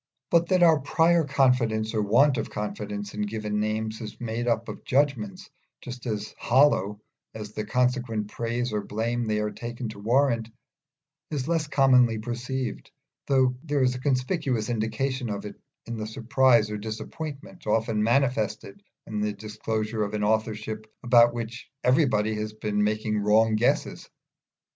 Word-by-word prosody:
But 170 0 +4
that 185 -1 +3
our 160 -3 +6
prior 165 +4 +3
confidence 125 -6 +2
or 110 - +1
want 125 +6 +4
of - - -3
confidence 105 0 -5
in 105 - -4
given 105 0 -2
names 110 +1 -2
is 110 -2 -8
made 120 0 -3
up 115 -1 0
of - - -8
judgments 130 -7 0 0.3
just 125 0 -8
as 105 -1 -3
hollow 120 -6 +3 0.4
as 105 -1 -7
the 105 0 -5
consequent 125 -3 0
praise 120 +1 -2
or 105 - 0
blame 115 +3 -2
they 105 0 0
are 105 0 -1
taken 120 0 -6
to 105 -1 -9
warrant, 115 0 +2 0.8
is 140 -3 -3
less 165 -2 0
commonly 125 -5 +4
perceived, 120 +1 -4 0.4
though 130 -2 +3
there 145 -4 +1
is 125 -1 +2
a 125 - -6
conspicuous 130 - 0
indication 120 +3 -2
of 100 -1 -4
it 105 - -9 0.2
in 115 -1 -5
the 110 0 -4
surprise 115 -1 +3
or 105 - -2
disappointment 140 - -7
often 110 0 +1
manifested 120 - 0 0.2
in 105 -1 -3
the 105 0 0
disclosure 110 +1 -3
of 105 0 -1
an 105 - -1
authorship 110 0 -1 0.2
about 120 -1 +6
which 120 +1 -6
everybody 125 -6 +3
has 105 0 -4
been 105 -1 -1
making 105 0 0
wrong 110 +2 +3
guesses. 115 +3 0
115 Hz, 155 wpm, -26 LUFS, 105-130 Hz, 0.8 s, our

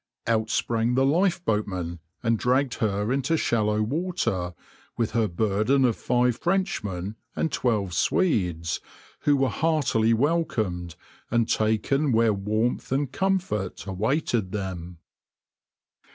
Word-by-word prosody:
Out 110 -1 +1
sprang 115 +2 +1
the 135 +1 +3
lifeboatmen 105 - 0 0.2
and 115 -2 +2
dragged 130 +1 +2
her 105 +1 0
into 140 +4 +1
shallow 105 -5 +1
water, 120 - -1 0.4
with 115 -2 0
her 115 -2 +2
burden 110 +8 +2
of 120 -3 +2
five 125 -1 +1
Frenchmen 110 - -1 0.2
and 160 - 0
twelve 105 -9 0
Swedes, 90 - +1 0.4
who 145 -1 +3
were 135 -1 +2
heartily 135 -9 +2
welcomed, 110 - 0 0.3
and 115 -1 +2
taken 110 +7 +1
where 115 -1 +4
warmth 110 +6 -1
and 135 0 0
comfort 185 - -1
awaited 105 - 0
them. 90 -4 -5
115 Hz, 115 wpm, -26 LUFS, 100-140 Hz, 0.4 s, where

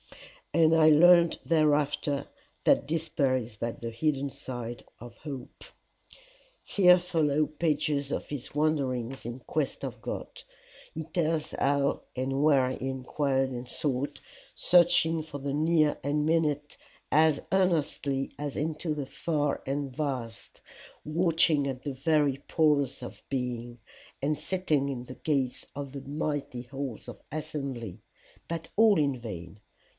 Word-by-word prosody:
And 165 -1 +5
I 155 -1 +6
learned 170 +2 +6
thereafter 150 -2 +2 0.4
that - - +4
despair 150 -4 +1
is 115 -3 -6
but 115 +2 -4
the 115 -1 -4
hidden 140 +2 -1
side 120 -2 -6 0.2
of 120 0 -11
hope.' 140 -4 -8 1.0
"Here 180 -3 +6
follow 155 -4 +1
pages 150 -3 0
of - - -2
his 140 -4 -6
wanderings 135 -5 0
in 120 +2 -5
quest - - -2
of - - -7
God. - - -6 0.5
He 160 - -4
tells 160 -1 -1
how 140 0 +1
and 135 +2 -1
where 135 -4 +4
he 130 +1 -3
inquired 135 0 0
and 125 0 -6
sought, 140 -3 -2 0.4
searching 170 -2 +4
into 155 -2 -6
the 140 0 -3
near 155 0 +3
and 150 +2 0
minute 150 -2 0 0.3
as 155 -1 +4
earnestly 155 -7 +1
as 145 -2 -4
into 155 +1 -2
the 145 -2 -3
far 145 +1 -1
and 140 +1 -1
vast, 130 -7 -4 0.4
watching 160 -3 +2
at 130 -2 -4
the 145 - -3
very 145 0 +2
pores 150 -5 +2
of - - -9
being, 120 -2 -3 0.4
and 150 +2 +1
sitting 155 -7 0
in 125 -3 -4
the 130 - -9
gates 135 -4 -1
of 140 -1 -6
the 140 - -6
mighty 140 -3 -3
halls 135 -1 -6
of - - -9
assembly 140 - -5 0.5
but 165 -1 -4
all 215 -2 +6
in 140 -4 +1
vain. 100 -7 -7
145 Hz, 135 wpm, -29 LUFS, 130-155 Hz, 1.0 s, I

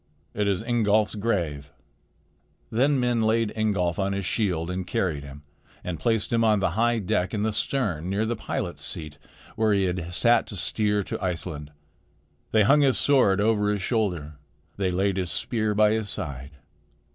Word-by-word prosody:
It 105 0 0
is 100 +1 0
Ingolf's 110 -3 +2
grave." 85 -10 -2 1.0
Then 135 +4 +2
men 120 -2 +1
laid 110 0 +1
Ingolf 100 -6 0
upon 100 0 0
his 100 -1 -3
shield 90 -5 -1
and 90 0 -4
carried 80 -7 -1
him 70 +1 -11 0.4
and 85 -3 -4
placed 115 -1 0
him 115 0 +3
on 110 -2 +3
the 95 - +1
high 115 +5 +2
deck 95 0 -1
in 105 - -1
the 110 0 0
stern 100 - -1
near 100 +3 0
the 120 +1 -1
pilot's - - -4
seat 75 -3 -5 0.4
where 110 -1 +2
he 100 -1 +2
had 90 -2 -2
sat 115 +6 +3
to 105 - -3
steer 105 +3 +1
to - - -5
Iceland. 80 -5 -4 0.8
They 110 -1 +4
hung 145 +8 +5
his 135 -3 +3
sword 125 -9 +3
over 105 -1 +2
his 100 -2 -2
shoulder. 90 - -1 0.4
They 95 -2 0
laid 95 +2 0
his 90 -2 -1
spear 110 0 -1
by 105 0 +4
his 110 -2 -1
side. 70 -3 -6
100 Hz, 175 wpm, -25 LUFS, 90-110 Hz, 1.0 s, hung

